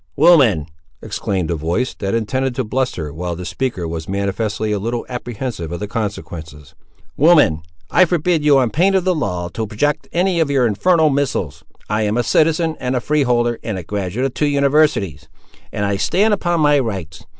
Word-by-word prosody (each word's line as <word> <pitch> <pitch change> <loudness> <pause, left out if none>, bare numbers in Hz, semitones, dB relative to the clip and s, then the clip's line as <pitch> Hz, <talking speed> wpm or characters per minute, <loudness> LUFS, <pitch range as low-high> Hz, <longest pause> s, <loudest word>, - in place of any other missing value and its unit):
"Woman!" 135 - +5 0.4
exclaimed 90 -4 -2
a - - 0
voice, 85 - -1
that 100 +1 -3
intended 130 +3 -1
to 130 - -1
bluster, 105 - -2
while 85 +2 -4
the 90 +1 -7
speaker 95 -2 -3
was 80 0 -5
manifestly 105 +2 -2
a 105 - 0
little 115 +3 -3
apprehensive 120 -8 -5
of 85 - -4
the 105 - -4
consequences; 80 - -6 0.4
"Woman, 150 - +4 0.3
I 185 - +6
forbid 175 -2 0
you 145 -2 +5
on 125 -4 +2
pain 190 - +2
of 190 - +2
the 185 0 +2
law 90 - -2
to 110 +5 -4
project 145 +8 -1
any 180 0 +1
of 160 -3 +2
your 135 -3 +2
infernal 155 - +3
missiles. 135 - -2 0.2
I 105 +1 0
am 105 +1 0
a 120 - +2
citizen, 160 +5 +2
and 125 +1 -2
a - - +1
freeholder, 120 -4 +1
and 110 -4 -3
a 90 - -6
graduate 100 +6 -3
of 135 - -2
two 150 - 0
universities; 140 - +1 0.4
and 100 - -2
I 100 0 0
stand 210 - +2
upon 175 -4 0
my 145 -1 +4
rights! 95 - -5
120 Hz, 185 wpm, -19 LUFS, 95-150 Hz, 0.4 s, I